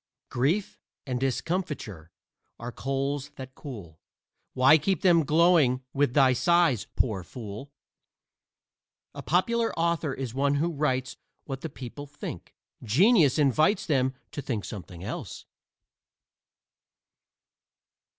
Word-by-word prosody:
Grief 150 +11 0 0.3
and 125 -3 -2
discomfiture 130 - -3 0.5
are 120 +1 -6
coals 135 +2 -3
that 130 -1 -9
cool: 100 - -10 0.6
Why 135 +5 +6
keep 185 +2 -1
them 170 -3 +5
glowing 155 -6 +4
with 140 -3 +1
thy 135 -3 +5
sighs, 170 - +2
poor 105 -6 0
fool? 110 +6 -9 1.4
A - - -7
popular 230 +7 +1
author 165 -3 0
is 130 -4 -5
one 140 +2 +1
who 165 +4 0
writes 130 -4 -1 0.3
what 135 -2 -6
the 160 - -5
people 140 +3 -9
think. 140 - -8 0.3
Genius 160 - +4
invites 155 - +3
them 130 -5 +1 0.2
to 145 - -5
think 120 -7 -3
something 90 -4 -8
else. - - -6
135 Hz, 110 wpm, -27 LUFS, 125-160 Hz, 1.4 s, Why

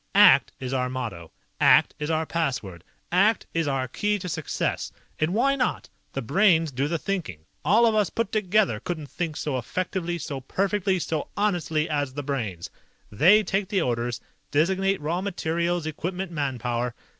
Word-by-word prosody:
"ACT - - +7
is 130 0 -4
our 125 -1 0
motto. 110 -11 -5 0.3
ACT - - +5
is 150 +1 -3
our 160 0 +1
password. 125 - -3 0.3
ACT 200 +6 +3
is 165 -2 0
our 135 -2 0
key 205 - 0
to 185 -2 -6
success. 160 -3 -2 0.3
And 155 +2 +1
why 260 +7 +2
not? 250 -2 -1 0.2
The 135 - -3
Brains 165 - +3
do 135 +2 -1
the 170 +2 -1
thinking. 165 - -4 0.2
All 215 +9 +5
of 225 - +3
us 210 -4 +2
put 230 -3 -2
together 205 - +2
couldn't 155 +1 -5
think 165 -3 -3
so 140 -5 -2
effectively, 175 - -3
so 140 -4 -5
perfectly, 195 +6 0
so 160 -3 -2
honestly 175 -6 0
as 145 -4 -2
the 145 - -3
Brains. 115 - -4 0.4
They 185 - +6
take 195 -1 -1
the 195 -3 +1
orders, 120 -2 -1 0.3
designate 190 +6 +2
raw 165 +5 -2
materials, 170 -3 -1
equipment, 180 +4 -4
manpower. 125 -5 -2
160 Hz, 165 wpm, -25 LUFS, 135-190 Hz, 0.4 s, ACT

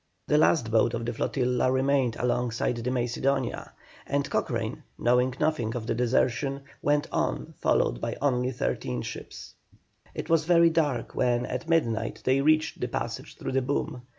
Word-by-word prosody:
The 150 - +3
last 130 -7 +3
boat 115 +1 +3
of 115 0 -4
the 120 - -2
flotilla 125 +2 0
remained 130 -2 +2
alongside 120 -1 0
the 120 +2 -2
Macedonia, 130 +2 -1 0.4
and 140 0 0
Cochrane, - - -2 0.2
knowing 125 +1 +2
nothing 150 -8 0
of 115 -2 -4
the - - 0
desertion, 130 +3 +1 0.2
went 145 0 +2
on, - - -1
followed - - +1
by - - -3
only 125 -3 +1
thirteen 65 - -2
boats. - - -8 0.6
It - - -4
was 165 -2 +3
very 170 -1 +5
dark 150 -6 0
when 120 0 +1
at 125 +5 -5
midnight 115 -9 0
they 130 +1 +3
reached 155 +2 +2
the - - 0
passage 60 - -5
through - - -4
the 135 0 +2
boom. 125 -1 -2
125 Hz, 160 wpm, -27 LUFS, 120-140 Hz, 0.6 s, very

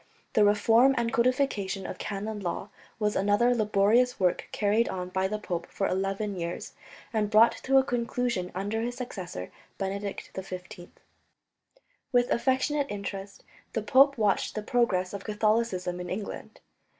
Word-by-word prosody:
The 215 - +5
reform 225 +6 +5
and 230 -1 0
codification 235 -6 +1
of 180 - -6
canon 210 +1 -4
law 190 +1 -4 0.3
was 210 -1 0
another 205 +5 +3
laborious 220 +3 +3
work 180 -2 +1
carried 215 +3 +2
on 180 -1 -4
by 190 +1 0
the 215 +2 -2
pope 175 -5 -4
for 195 - -2
eleven 195 +2 -1
years, 170 -1 -5 0.4
and 215 -2 +1
brought 220 +2 +6
to 270 0 +4
a 265 - +6
conclusion 240 -6 -1
under 205 +4 -2
his 240 +1 -3
successor 185 - -6 0.3
Benedict 200 +1 -4
XV. 185 -1 -8 1.2
With 245 -1 +3
affectionate 270 +3 +1
interest 200 -1 -6 0.3
the 225 - -1
pope 275 +5 +5
watched 210 -3 +1
the 215 - -3
progress 205 -6 +1
of 200 -1 -5
Catholicism 210 -4 0
in 180 0 -5
England. 200 +2 -6
210 Hz, 145 wpm, -28 LUFS, 190-235 Hz, 1.2 s, brought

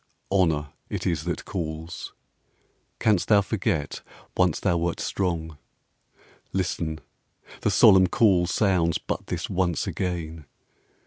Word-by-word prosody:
Honour 80 -7 +2 0.2
it - - -4
is 80 -3 -1
that 85 - -3
calls: 80 -2 -5 0.8
canst 105 -5 +2
thou 105 -2 +5
forget 95 -8 -2 0.3
Once 90 -4 +2
thou 90 -4 +1
wert 85 0 -1
strong? 80 -5 -2 0.9
Listen; 85 -4 -2 0.6
the - - +2
solemn 95 -1 +6
call 90 -3 +3
Sounds 90 -4 +2
but - - -5
this - - -3
once 90 -3 0
again. 80 -4 -4
85 Hz, 115 wpm, -25 LUFS, 80-95 Hz, 0.9 s, solemn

